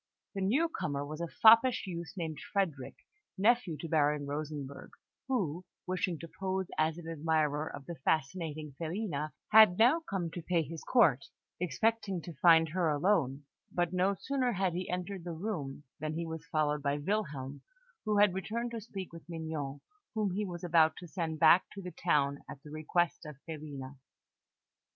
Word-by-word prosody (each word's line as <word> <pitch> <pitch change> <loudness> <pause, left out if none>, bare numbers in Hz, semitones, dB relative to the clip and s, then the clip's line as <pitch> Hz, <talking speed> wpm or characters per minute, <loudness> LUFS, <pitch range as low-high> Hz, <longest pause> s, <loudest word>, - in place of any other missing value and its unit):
The 195 - -3
newcomer 190 - 0
was 155 +3 -6
a 170 - -2
foppish 230 +7 +6
youth, 170 -3 -6
named 160 -4 -4
Frederick, 165 -10 -1 0.4
nephew 210 -5 +3
to 165 - -4
Baron 150 -2 +2
Rosenberg, 145 -1 -5 0.4
who, 185 - -1 0.2
wishing 180 -2 -1
to 165 - -7
pose 190 0 -1
as 155 +1 +1
an 170 -2 -9
admirer 155 -1 0
of 135 - -8
the 170 - -5
fascinating 155 0 -2
Filina, 165 -3 -2 0.2
had 215 -4 +8
now 250 +9 +5
come 195 - -3
to 175 - -6
pay 170 0 +1
his 160 +2 -8
court, 165 - +4 0.3
expecting 195 - 0
to 170 - -7
find 165 +2 +5
her 170 0 +1
alone; 145 -3 +1 0.3
but 175 0 0
no 185 +2 +2
sooner 255 +3 -1
had 190 -2 0
he 180 +2 -3
entered 180 +1 -3
the 175 -1 -5
room 160 -7 -4 0.2
than 155 +1 -3
he 170 +1 -2
was 160 -1 -7
followed 150 -1 +1
by 140 0 0
Wilhelm, 145 -6 -3 0.4
who 210 -1 +1
had 205 -2 +5
returned 230 +5 -3
to 230 -1 -5
speak 195 -5 -7
with 165 +1 -12
Mignon, 160 -4 -4 0.3
whom 210 -3 +1
he 205 +3 -2
was 175 -1 -7
about 160 -2 +4
to 180 - -9
send 165 -2 -3
back 180 - +7
to 200 - -7
the 180 - -6
town 140 -5 +1
at - - -7
the 150 - -11
request 160 +3 0
of 150 -4 -9
Filina. 145 -4 -7
165 Hz, 170 wpm, -32 LUFS, 150-190 Hz, 0.4 s, had